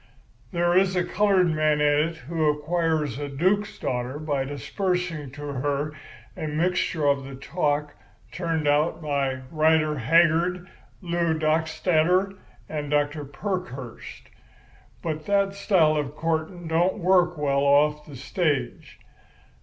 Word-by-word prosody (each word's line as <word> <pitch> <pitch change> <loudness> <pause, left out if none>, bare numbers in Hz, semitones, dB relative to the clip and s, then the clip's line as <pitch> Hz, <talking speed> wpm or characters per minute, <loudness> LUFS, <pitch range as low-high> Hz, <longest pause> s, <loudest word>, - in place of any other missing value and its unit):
There 175 -1 +1
is 190 0 +3
a 180 - +2
coloured 190 -2 +2
man 155 -1 +2
in 150 +2 +3
it 165 - -10
who 160 0 +1
acquires 150 -2 -1
a 145 -1 -4
duke's 185 +9 0
daughter 125 +2 -3
by 145 -3 -2
disbursing 170 +1 -3
to 145 +1 -9
her 145 +1 -2 0.4
a 155 - -4
mixture 165 0 0
of 140 -1 +2
the 135 0 -8
talk 145 0 -1 0.4
turned 165 -4 -2
out 150 +3 +2
by 140 -4 -1
Rider 155 -1 +2
Haggard, 170 +6 +3 0.4
Lew 170 -2 0
Dockstader, 160 +4 +1 0.3
and 150 -2 -4
Dr. 145 +1 0
Parkhurst. 140 - -6 0.7
But 155 -2 -4
that 200 -1 +2
style 180 -6 +3
of 145 -1 -3
courting 165 +2 -2
don't 170 +5 +1
work 180 -2 +3
well 140 -2 +1
off 150 +2 +3
the 145 - -10
stage. 120 - -2
155 Hz, 130 wpm, -25 LUFS, 145-175 Hz, 0.7 s, is